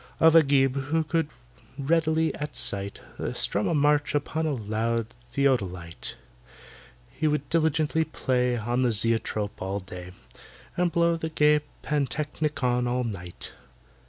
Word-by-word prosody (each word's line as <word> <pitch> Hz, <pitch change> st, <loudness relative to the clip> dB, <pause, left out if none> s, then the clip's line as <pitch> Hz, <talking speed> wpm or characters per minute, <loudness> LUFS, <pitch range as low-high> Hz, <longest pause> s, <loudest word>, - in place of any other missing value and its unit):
Of 160 Hz, 0 st, +6 dB
AGIB, 135 Hz, -3 st, +4 dB
who 160 Hz, +3 st, +1 dB
could 160 Hz, 0 st, 0 dB, 0.5 s
readily, 160 Hz, +2 st, +2 dB
at 150 Hz, 0 st, -5 dB
sight, 100 Hz, 0 st, -1 dB, 0.3 s
Strum 105 Hz, -, 0 dB
a 170 Hz, -, +1 dB
march 145 Hz, 0 st, +2 dB
upon 155 Hz, +2 st, -1 dB
the 150 Hz, -4 st, 0 dB
loud 115 Hz, +1 st, -1 dB, 0.2 s
Theodolite. 95 Hz, -11 st, -1 dB, 1.0 s
He 155 Hz, -, -1 dB
would 150 Hz, -2 st, 0 dB
diligently 160 Hz, 0 st, +2 dB
play 125 Hz, -5 st, 0 dB
On 120 Hz, +3 st, -1 dB
the 125 Hz, -2 st, +3 dB
Zoetrope 110 Hz, -1 st, 0 dB
all 95 Hz, +2 st, -2 dB
day, 90 Hz, -1 st, -9 dB, 0.6 s
And 175 Hz, -1 st, +1 dB
blow 170 Hz, 0 st, +2 dB
the 160 Hz, 0 st, -3 dB
gay 150 Hz, -1 st, +4 dB, 0.2 s
Pantechnicon 145 Hz, -3 st, 0 dB
all 125 Hz, +1 st, 0 dB
night. 90 Hz, -7 st, -6 dB
140 Hz, 130 wpm, -26 LUFS, 115-155 Hz, 1.0 s, Of